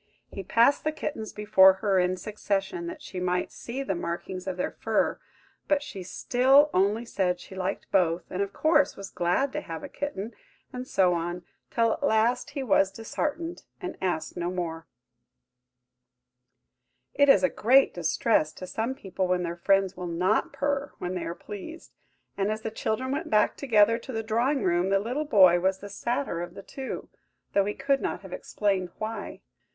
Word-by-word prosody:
He 195 - -5
passed 235 +8 +3
the 310 - +1
kittens 290 -7 -5
before 195 -2 +6
her 195 -1 +1
in 180 +1 +1
succession, 210 - -2
that 340 -3 -7
she 185 - -6
might 180 0 -1
see 260 +3 -5
the 230 - -1
markings 175 +2 -5
of 185 -1 -3
their 180 - -1
fur, - - 0 0.5
but 295 -1 +2
she 195 -9 -7
still 260 +10 +3
only 205 +5 +2
said 180 -5 0
she - - -12
liked 190 +1 -3
both, 175 -2 +2
and, 185 - -2
of 200 0 -1
course, 300 +2 +2
was 195 -1 -8
glad 180 +11 0
to 300 - -2
have 300 - -7
a - - -5
kitten, 240 -7 -5 0.4
and 250 0 -5
so 185 -6 +3
on; 175 +1 -3 0.3
till, 230 -1 +2
at - - -7
last, 245 0 +2
he 285 -2 -4
was 195 -5 +3
disheartened, 305 - -4 0.2
and 360 -2 -5
asked 180 -4 -2
no 175 -1 -2
more. 165 -3 -4 2.3
It 285 0 +4
is 275 - +6
a - - +6
great 265 +2 +4
distress 165 0 +1
to 185 - -8
some 225 +7 -3
people 190 -4 -3
when 180 0 +1
their 170 0 -3
friends 195 +2 +2
will 180 -1 -5
not 180 +5 +1
purr 280 0 -2
when 180 +1 -4
they 180 - -3
are 170 - -4
pleased; 265 - -9 0.4
and 200 +1 0
as 215 0 -4
the 220 - -3
children 225 +4 -2
went 315 +4 -2
back 210 -1 +3
together 230 -3 +3
to 260 - -9
the 225 -2 -3
drawing 240 +6 +1
room, 175 +1 +2
the 195 - +4
little 250 +9 -2
boy 185 -9 +6
was 190 +1 +1
the 205 +1 -9
sadder 235 -3 -2
of 175 - -7
the 195 - -9
two, 265 +5 -6 0.5
though 200 -1 +3
he 205 - -2
could 275 0 +1
not - - -3
have - - -9
explained 195 -3 -1
why. 215 -1 -5
205 Hz, 185 wpm, -27 LUFS, 185-265 Hz, 2.3 s, before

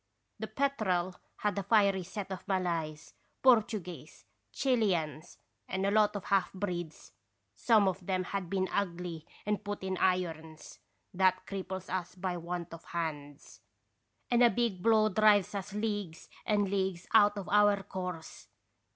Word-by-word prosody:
" - - -49
The 220 - -4
Petrel 215 -9 0 0.2
had 205 -1 -1
a - - -1
fiery 200 -2 +3
set 195 +2 -6
of 185 - -6
Malays, 170 -5 -2 0.3
Por 255 -2 +8
tuguese, 180 - -8 0.3
Chileans, 185 - 0 0.3
and 190 +1 -2
a 200 - +2
lot 210 0 +3
of 205 - -4
half 195 -2 +1
breeds. 175 -5 -5 0.4
Some 220 -4 +4
of 190 0 -3
'em 185 -1 +1
had 185 -1 -4
been 190 0 0
ugly 175 -4 -3 0.2
and 210 0 -1
put 205 -1 -5
in 190 -1 -2
irons; 165 -4 -2 0.3
that 185 0 +2
cripples 190 -1 -5
us 180 -1 -3
by 180 -1 -3
want 175 0 -5
of 165 - -10
hands, 150 -4 -6 0.7
and 240 0 +4
a 240 - +8
big 220 -4 -1
blow 220 0 +4
drives 210 -2 +4
us 200 0 -4
leagues 205 -5 -3 0.2
and 205 -2 +2
leagues 190 -3 -1
out 210 -1 +6
of 195 - -5
our 205 -1 +4
course. 180 -4 -6
190 Hz, 150 wpm, -31 LUFS, 175-205 Hz, 0.7 s, Por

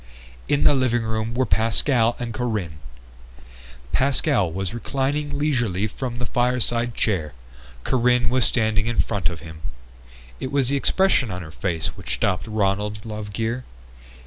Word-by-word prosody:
In 145 - +2
the 145 - +6
living 125 -3 +2
room 110 +1 -2
were 130 +1 +2
Pascal 115 +1 +2
and 120 -2 -4
Corinne. 105 -11 -2 1.1
Pascal 130 - +2
was 95 +4 -3
reclining 140 +5 -1
leisurely 120 -10 0 0.2
in 125 -2 -2
the 120 - -2
fireside 120 -1 +1
chair; 85 - 0 0.5
Corinne 125 -1 +2
was 130 -1 +3
standing 110 -2 +1
in 120 - -1
front 100 -5 +1
of 85 -2 -7
him. 80 -1 -10 0.8
It 130 - -4
was 140 -3 +2
the 140 - +1
expression 145 - +3
on 90 -1 -5
her 80 - -10
face 80 -1 -2
which - - -3
stopped 95 +4 0
Ronald 105 0 -1
Lovegear. 110 +3 -3
115 Hz, 145 wpm, -23 LUFS, 100-130 Hz, 1.1 s, the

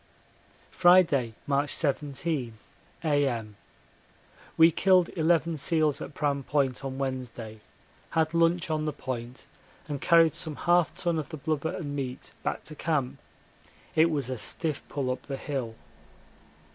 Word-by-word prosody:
Friday, 170 -10 +4
March 140 +1 +1
17, 140 -4 -1 0.5
A.M. 135 -9 0 1.0
We 165 +1 +7
killed 185 +1 +4
eleven 165 -1 +2
seals 155 0 +1
at - - -7
Pram 140 -2 0
Point 135 -2 0
on 135 -1 -4
Wednesday, 125 -5 -5 0.5
had 160 0 +1
lunch 170 0 +2
on 155 0 0
the 150 - -1
Point, 125 -1 -6 0.4
and 145 -3 -4
carried 165 -3 +5
some 155 -3 -2
half 175 +3 +3
ton 170 -3 0
of 150 - -5
the 155 - -6
blubber 160 +3 -2
and 145 -5 -5
meat 130 -2 -5
back - - -3
to 155 - -6
camp 150 -5 -1 0.8
it 160 +1 +5
was 140 -5 -2
a 125 - -4
stiff 155 +3 -2
pull 135 -3 -2
up 130 - -4
the 135 -2 -4
hill. 130 -6 -4
145 Hz, 140 wpm, -28 LUFS, 130-165 Hz, 1.0 s, We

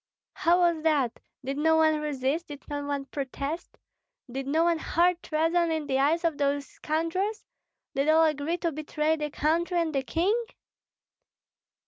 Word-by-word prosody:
"How 350 +2 +3
was 340 -2 +2
that? 285 -7 +1 0.3
Did 275 +2 -2
no 320 +1 +4
one 315 -1 +4
resist, 295 +2 -1
did 290 -2 -10
no 290 -1 -3
one 280 -1 -2
protest? 280 +4 -5 0.5
Did 270 +1 -4
no 315 +4 +2
one 340 -1 +2
hurl 350 +3 +3
treason 330 +2 +1
in 315 -2 -1
the 265 -1 0
eyes 315 +5 +2
of 330 -3 0
those 285 0 +1
scoundrels? 335 +7 -2 0.5
Did 275 +3 +1
all 320 +1 +6
agree 310 +2 0
to 335 -1 -1
betray 305 +1 0
the 300 -1 -3
country 335 +5 0
and 325 -2 0
the 275 - +1
king?" 350 - 0
310 Hz, 160 wpm, -27 LUFS, 285-335 Hz, 0.5 s, all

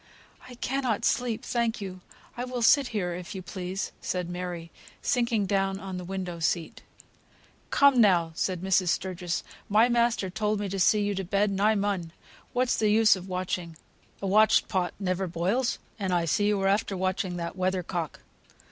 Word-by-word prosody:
"I 250 - -10
cannot 250 -3 -1
sleep, 240 -3 0
thank 235 -1 0
you. 185 -2 -7 0.3
I 245 - -3
will 250 -1 -3
sit 280 +3 +5
here, 185 -7 -2
if 180 +2 -7
you 190 - -6
please," 185 +1 -4
said 180 -1 -2
Mary, 175 -2 -5 0.3
sinking 235 -5 +1
down 195 0 0
on 190 -1 -6
the 180 - -5
window 180 -2 -5
seat. 165 0 -1 0.9
"Come, 280 -3 +5
now," 175 -6 +4
said 180 +2 -2
Mrs. 190 -1 +2
Sturgis, 180 -1 -2 0.3
"my 220 +4 +5
master 235 -5 +1
told 210 +1 0
me 205 -1 -2
to 195 +1 -3
see 205 +3 +4
you 205 0 0
to 195 0 -3
bed, 200 +3 +1
and 195 0 -2
I 215 +1 +4
mun. 195 -5 -1 0.4
What's 250 0 +1
the 215 - +2
use 215 0 +5
of 185 0 -9
watching? 180 -2 -3 0.5
A - - 0
watched 215 +3 +4
pot 180 -4 -1
never 185 -1 -1
boils, 185 +9 0 0.2
and 190 -2 -1
I 175 -2 +2
see 205 +5 +1
you 210 -1 +2
are 195 - +2
after 200 0 +1
watching 185 -1 -1
that 170 +1 -4
weather 185 0 0
cock. 170 -3 -4
195 Hz, 185 wpm, -27 LUFS, 180-215 Hz, 0.9 s, sit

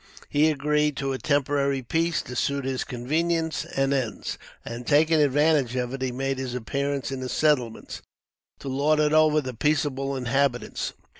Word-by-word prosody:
He 145 +1 +3
had 155 - +1
agreed 150 +1 +1
to 135 -1 -1
a 130 - -4
temporary 140 -2 +1
peace, 165 +6 0
to 125 - -8
suit 140 +2 -1
his 130 -1 -1
convenience 160 +6 -1
and 135 0 0
ends; 130 -6 -3 0.3
and, 120 +1 -7
taking 155 +2 +4
advantage 145 -2 +2
of 125 0 -2
it, 135 - -5
he 130 -1 -1
made 135 +1 -2
his 130 -2 -4
appearance 140 +2 -2
in 135 - -4
the 130 0 -4
settlements, 130 -8 0 0.6
to - - -8
lord 145 +3 +2
it 150 0 +2
over 155 -1 +4
the 130 -2 -5
peaceable 140 +1 0
inhabitants. 130 0 -1
140 Hz, 170 wpm, -25 LUFS, 130-150 Hz, 0.6 s, taking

